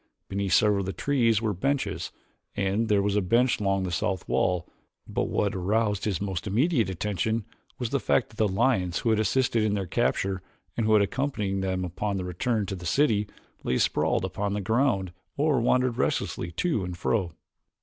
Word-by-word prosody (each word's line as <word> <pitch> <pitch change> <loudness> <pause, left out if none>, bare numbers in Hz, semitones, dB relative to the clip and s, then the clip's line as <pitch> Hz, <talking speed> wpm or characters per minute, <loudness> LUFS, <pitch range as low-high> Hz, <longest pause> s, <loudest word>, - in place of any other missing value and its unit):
Beneath 100 -2 -1
several 105 -1 +4
of 95 - -3
the 95 - -2
trees 115 -6 +1
were 110 -2 +1
benches 135 +9 -1 0.5
and 100 +3 0
there 100 -1 +3
was 100 0 0
a 105 - +3
bench 120 +7 +2
along 95 -2 +1
the 90 - -3
south 95 +3 -1
wall, 90 -2 +1 0.4
but - - -1
what 100 - 0
aroused 105 +2 0
his 100 -6 0
most 95 -2 -3
immediate 120 - +2
attention 105 +4 -1 0.3
was 120 -3 -3
the 140 - +1
fact 125 - +1
that 110 - -18
the 110 - +3
lions 95 -3 +1
who 115 - +1
had 110 - +2
assisted 115 +2 +2
in 105 -1 +1
their 100 -2 -2
capture 95 +2 0 0.3
and 115 -2 0
who 110 - +4
had 105 - +5
accompanied 105 -4 -1
them 95 -1 -1
upon 100 +3 -2
the 90 - -3
return 105 +5 -1
to 95 - -4
the 90 -2 -6
city, 105 - +2 0.4
lay 65 - 0
sprawled - - +1
about - - -7
upon 100 -1 0
the 105 - -1
ground 100 -4 +1 0.2
or 145 -3 +2
wandered 125 0 +2
restlessly 85 - -1
to 155 - 0
and 90 -1 -5
fro. 90 -2 0
105 Hz, 195 wpm, -27 LUFS, 95-115 Hz, 0.5 s, had